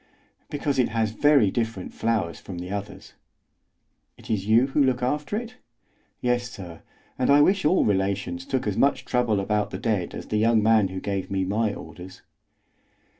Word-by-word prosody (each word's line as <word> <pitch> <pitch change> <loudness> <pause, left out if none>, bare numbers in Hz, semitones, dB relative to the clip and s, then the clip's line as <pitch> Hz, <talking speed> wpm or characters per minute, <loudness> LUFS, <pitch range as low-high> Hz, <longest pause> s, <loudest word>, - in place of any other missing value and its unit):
"Because 145 -2 -1
it 125 - +3
has 110 -1 0
very 140 -4 +4
different 115 -5 -3
flowers 110 -7 -1
from 95 - -8
the 90 +2 -6
others." 100 0 -6 1.0
"Is - - -9
it 110 - +1
you 115 +3 +5
who 140 +1 +2
look 125 -2 +1
after 150 +9 -1
it?" 240 +2 -7 0.6
"Yes, 125 0 0
sir; 90 -7 -10 0.4
and 130 - +1
I 140 +1 +7
wish 190 +4 +3
all 175 +5 +3
relations 95 -3 -1
took 130 - -1
as 105 -2 -2
much 135 -2 +2
trouble 120 -5 +1
about 105 +1 0
the - - -5
dead 110 -7 -2
as - - -8
the 105 - 0
young 110 0 +3
man 110 -2 +4
who 95 0 -6
gave 100 0 -3
me 95 -1 -1
my 105 +2 0
orders." 90 +4 -11
110 Hz, 175 wpm, -25 LUFS, 95-130 Hz, 1.0 s, I